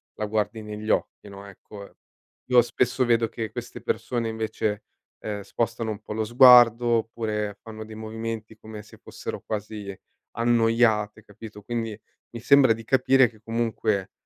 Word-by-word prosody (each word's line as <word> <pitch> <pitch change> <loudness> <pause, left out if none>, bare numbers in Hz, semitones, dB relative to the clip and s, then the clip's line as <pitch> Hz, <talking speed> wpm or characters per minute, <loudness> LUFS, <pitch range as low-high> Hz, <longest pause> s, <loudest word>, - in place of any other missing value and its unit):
la 105 - -3
guardi 110 +1 -2
negli 105 +1 -7
occhi, 105 - -1
no, 100 0 -11
ecco, 100 +1 -13 0.5
io 125 -1 +6
spesso 125 +2 0
vedo 115 -1 +2
che 110 -1 -5
queste - - -7
persone 120 -2 -2
invece, 110 -1 -3 0.4
ehm, 105 -1 -5
spostano 115 +2 -3
un 105 0 -7
po' 105 - -11
lo 110 0 -2
sguardo 120 0 +7
oppure 110 -3 -1
fanno 110 -1 -9
dei 110 0 -11
movimenti 110 0 -6
come 110 -1 -10
se - - -17
fossero - - -8
quasi 105 -2 -6 0.3
annoiate, 115 -2 +1
capito, 105 0 -12
quindi 115 -1 -4 0.3
mi 120 - -7
sembra 135 -2 +5
di 115 0 -9
capire 130 +1 +3
che 110 - -21
comunque, 110 -3 -2
110 Hz, 150 wpm, -25 LUFS, 105-115 Hz, 0.5 s, sguardo